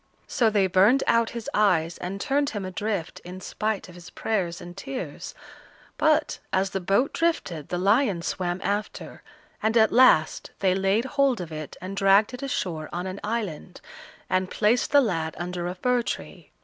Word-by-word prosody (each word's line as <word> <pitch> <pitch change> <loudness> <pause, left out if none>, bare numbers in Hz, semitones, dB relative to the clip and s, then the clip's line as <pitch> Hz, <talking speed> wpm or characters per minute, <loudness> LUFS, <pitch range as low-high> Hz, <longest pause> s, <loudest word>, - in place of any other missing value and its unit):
So 230 -3 +2
they 205 -2 +2
burned 195 +8 +4
out 230 -1 +3
his 230 - -6
eyes 175 -6 +2
and 190 +3 -5
turned 280 +6 +1
him 205 -3 -5
adrift, 185 -1 -3
in 180 +1 -8
spite 215 +2 -3
of 180 - -13
his 175 0 -12
prayers 180 -4 -2
and 175 0 -10
tears; 260 +6 -6 0.6
but, 310 0 +2
as 190 +1 +1
the 195 - -2
boat 195 +9 +1
drifted, 325 - -1
the 175 - -2
lions 200 -1 +2
swam 180 -1 -2
after, 205 +1 -3 0.4
and 220 +2 +2
at 220 -1 +5
last 235 -11 +4
they 190 -2 +2
laid 195 +5 +1
hold 275 -3 +1
of 170 -3 -6
it 155 -1 -7
and 185 +2 -6
dragged 200 +4 +4
it 250 - -7
ashore 180 - -3
on 175 +1 -4
an 190 +1 -5
island, 205 -6 -4 0.5
and 185 0 0
placed 225 +4 +2
the 285 0 +6
lad 165 -9 -1
under 175 0 -4
a 180 - -4
fir 250 +6 +1
tree. - - -6
195 Hz, 175 wpm, -25 LUFS, 180-230 Hz, 0.6 s, the